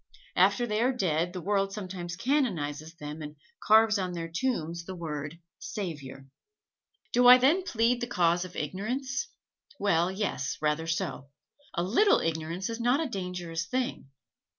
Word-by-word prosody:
After 240 - +4
they 215 -1 -1
are 250 +2 +3
dead 175 -8 0
the 180 0 -6
world 195 +1 +1
sometimes 185 -4 -5
canonizes 170 - -1
them 150 -1 -7
and 150 0 -7 0.3
carves 220 0 +5
on 185 -1 -2
their 165 -1 -4
tombs 170 -4 -2
the 185 - -6
word 155 -2 -5 0.2
"Savior." 145 -9 -6 0.9
Do 245 +1 +5
I 250 0 +11
then 285 +9 +4
plead 240 -7 +1
the 240 - -1
cause 175 -5 +2
of 180 -1 -9
ignorance? 260 - -3 0.5
Well, 175 -3 +2
yes, 190 -9 -2
rather 150 +2 0
so. 160 -4 -2 0.5
A 170 - +1
little 255 - +4
ignorance 165 +3 -2
is 230 0 -4
not 245 +4 +3
a 325 - 0
dangerous 180 -5 -4
thing. 255 - -2
185 Hz, 150 wpm, -29 LUFS, 165-235 Hz, 0.9 s, I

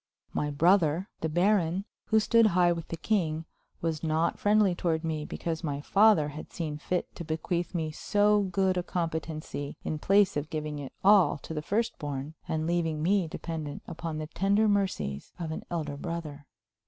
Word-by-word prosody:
My 150 - 0
brother, 170 +3 +3
the 160 - -1
baron, 180 +1 +2 0.2
who 220 - +4
stood 230 +1 +5
high 175 -3 +4
with 165 -2 -3
the 165 - -5
king, 165 -5 0 0.4
was 160 -2 -1
not 160 +1 0
friendly 205 -2 +4
toward 165 -2 -1
me 155 -2 -2
because 165 +1 -4
my 145 -3 -2
father 195 -2 +4
had 150 +2 -9
seen 155 -4 -4
fit 180 +3 -2
to 170 - -6
bequeath 170 +3 -2
me 160 -2 -1
so 205 +5 +2
good 190 -1 +1
a - - +2
competency 160 -4 -4
in 155 - -3
place 200 +3 +4
of 145 +1 -2
giving 150 -1 -4
it 140 -2 -7
all 195 -4 +6
to - - -6
the 150 - -2
first 220 +8 -1
born 145 0 -4
and 160 0 -1
leaving 165 -2 0
me 190 0 +2
dependent 155 -2 -5
upon 165 -1 -5
the 155 - -3
tender 200 +6 +2
mercies 190 - -1
of 165 -2 -3
an 160 - -4
elder 150 -4 -3
brother. 155 -3 -6
165 Hz, 180 wpm, -29 LUFS, 155-190 Hz, 0.4 s, all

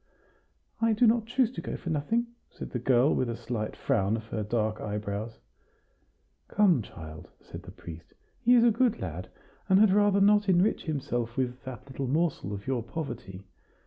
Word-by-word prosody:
"I 225 -1 +3
do 225 +3 +3
not 225 -1 +3
choose 245 -1 +2
to - - -6
go - - -5
for 170 - -5
nothing," 190 +11 0 0.2
said - - -9
the 125 - -2
girl, 125 +3 +3
with 125 - 0
a 115 - -2
slight 110 -3 -4
frown 110 -5 +1
of 110 - -8
her 110 - -2
dark 110 0 -1
eyebrows. 105 +1 -4 1.1
"Come, 190 - +3
child," 80 -6 -10
said - - -10
the - - -11
priest; 85 0 -11 0.3
"he 245 +1 +6
is 235 - +6
a 235 - +6
good 235 +1 +1
lad, 90 +1 -5 0.4
and 190 - +6
had 215 -2 +6
rather 205 -1 +4
not 205 0 +4
enrich 185 +4 +2
himself 120 -6 -3
with 125 -1 -2
that 130 -1 -8
little 135 0 -5
morsel 150 - 0
of 100 0 -6
your 130 -3 -1
poverty. 110 - -6
130 Hz, 180 wpm, -28 LUFS, -, 1.1 s, he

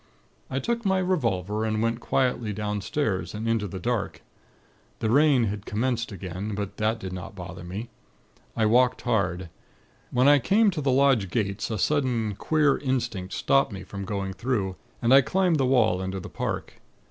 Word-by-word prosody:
"I 130 - -3
took 235 - -1
my 190 -2 +2
revolver, 110 - 0
and 110 -1 0
went 115 +1 0
quietly 125 -4 0
downstairs, 105 +1 -2
and 110 +2 -4
into 115 -2 +1
the 95 - -6
dark. 120 +1 -2 0.7
The 110 - -1
rain 140 -2 +5
had 105 -2 -3
commenced 120 +2 -1
again; 95 +2 -5
but 100 -1 -5
that 110 +1 +1
did 95 -3 -6
not 95 +2 -7
bother 90 -1 -8
me. 100 +7 -6 0.7
I 110 - +3
walked 125 +3 +3
hard. 95 -7 -1 0.6
When 125 +2 +3
I 145 0 +7
came 205 - +3
to 165 -4 -3
the 140 - 0
lodge 130 -7 +3
gates, 100 -2 -2
a 110 - -2
sudden, 120 -3 +1
queer 150 +6 +2
instinct 120 -9 -2
stopped 135 -2 +2
me 95 -1 -7
from 100 +1 -7
going 95 -1 -3
through, 100 -5 -1 0.3
and 120 +2 +4
I 135 - +9
climbed 175 +3 +1
the 130 - +2
wall 125 -8 +3
into 95 +1 -3
the - - -8
park. - - -4
115 Hz, 175 wpm, -26 LUFS, 100-130 Hz, 0.7 s, I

